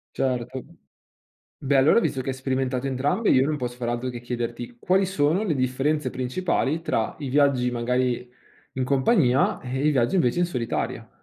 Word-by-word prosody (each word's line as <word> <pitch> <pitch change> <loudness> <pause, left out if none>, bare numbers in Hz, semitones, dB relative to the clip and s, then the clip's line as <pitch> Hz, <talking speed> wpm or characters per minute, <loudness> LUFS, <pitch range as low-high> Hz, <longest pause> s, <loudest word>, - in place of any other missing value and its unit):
Certo. 130 -1 -2 1.0
Beh 140 0 +2
allora 140 +12 +5
visto 135 - -1
che 135 - -7
hai 130 - -4
sperimentato 130 0 -2
entrambe 145 - 0
io 130 +1 +4
non 150 -1 -1
posso 125 -2 -4
far 120 -1 -4
altro 120 +2 -2
che 120 -1 -7
chiederti: 120 0 -5
quali 190 +1 +2
sono 180 +2 +1
le 165 -8 0
differenze 135 +4 0
principali 140 +4 -1
tra 110 -8 -1
i 140 - -4
viaggi 135 -3 +2
magari 125 +1 -1 0.4
in 130 -1 -2
compagnia 135 - +2
e 130 +3 -2
i 150 - +5
viaggi 130 +5 +1
invece 170 -1 +2
in 175 - +3
solitaria? 125 -9 -3
130 Hz, 170 wpm, -24 LUFS, 125-145 Hz, 1.0 s, allora